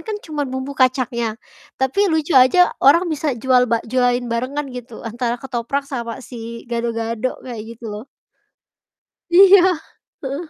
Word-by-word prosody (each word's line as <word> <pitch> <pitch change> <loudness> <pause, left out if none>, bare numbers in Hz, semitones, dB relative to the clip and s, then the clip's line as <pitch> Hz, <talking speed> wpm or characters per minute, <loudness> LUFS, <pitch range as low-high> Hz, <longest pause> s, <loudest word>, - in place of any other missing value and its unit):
kan 435 -2 -5
cuman 295 -4 -3
bumbu 260 +2 -5
kacangnya, 250 -4 0 0.4
tapi 270 +10 +1
lucu 320 0 0
aja 265 +8 +5
orang 330 +7 +5
bisa 295 -3 -2
jual 250 +1 +2
ba 230 -1 0
jualin 245 +1 +1
barengan 265 +5 -2
gitu 240 -2 -9
antara 235 +1 -2
ketoprak 265 +2 -3
sama 240 -3 -6
si 230 -1 -8
gado-gado 230 0 -3
kayak 230 -2 -8
gitu 235 - -15
loh. 215 +5 -8 1.2
Iya, 380 +1 +7 0.6
heeh 280 +5 -4
255 Hz, 135 wpm, -20 LUFS, 235-280 Hz, 1.2 s, Iya